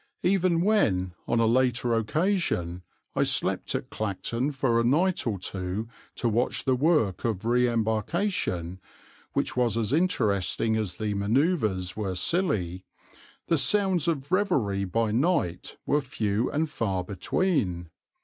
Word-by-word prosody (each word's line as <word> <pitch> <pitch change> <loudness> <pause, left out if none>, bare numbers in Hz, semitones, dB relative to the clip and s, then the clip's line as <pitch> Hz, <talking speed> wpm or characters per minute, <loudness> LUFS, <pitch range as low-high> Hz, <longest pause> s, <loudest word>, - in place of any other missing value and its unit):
Even 180 -2 +2
when, 100 - +2
on 120 - +1
a 115 - +4
later 125 0 +2
occasion, 115 - 0 0.3
I - - +1
slept - - +1
at - - -4
Clacton 115 +6 -2
for 130 -4 +1
a - - +2
night 165 +7 +2
or 105 -4 -1
two 95 +4 -4 0.3
to 120 - -1
watch 115 +3 0
the 130 - +3
work 135 - +1
of 110 -3 -2
re 125 +1 +3
embarkation, 110 - -1 0.5
which - - -1
was 120 -3 +1
as 115 +2 -1
interesting 110 - +1
as 105 -5 -2
the 110 -1 -2
manoeuvres 105 - 0
were 100 -4 -3
silly, 95 - 0 0.6
the 165 - +2
sounds 185 +3 +3
of 145 -2 -2
revelry 135 - +1
by 110 +4 0
night 125 - 0
were 150 - +2
few 115 -4 -1
and 155 +2 0
far 95 -9 -1
between. 90 - -1
115 Hz, 140 wpm, -27 LUFS, 100-155 Hz, 0.6 s, a